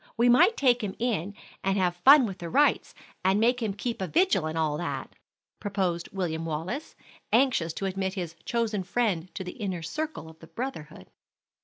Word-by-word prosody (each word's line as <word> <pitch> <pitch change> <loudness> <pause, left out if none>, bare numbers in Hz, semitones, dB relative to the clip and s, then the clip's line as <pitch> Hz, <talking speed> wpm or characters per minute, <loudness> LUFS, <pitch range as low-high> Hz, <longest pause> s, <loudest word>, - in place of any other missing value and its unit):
We 240 +1 +4
might 350 - +5
take 245 -4 +3
him 195 -2 -3
in 205 -5 -2 0.3
and 195 +1 +1
have 180 -2 +1
fun 265 +9 +7
with 195 -4 -6
the 170 - -5
rites, 290 - +2 0.3
and 190 +2 +3
make 245 +3 +2
him 210 -4 -2
keep 230 +1 -4
a 190 - -1
vigil 340 - +2
and 160 +1 -4
all 155 -2 +1
that," 175 - -4 0.5
proposed 190 -4 -2
William 170 -4 -2
Wallace, 165 - -4 0.4
anxious 230 -9 +3
to 195 - -4
admit 190 0 -2
his 175 -4 -5
chosen 225 -4 -1
friend 185 -3 -1
to - - -4
the 180 - -6
inner 190 -7 -4
circle 305 - -4
of 160 0 -14
the 165 - -13
brotherhood. 245 - -7
195 Hz, 185 wpm, -27 LUFS, 175-240 Hz, 0.5 s, fun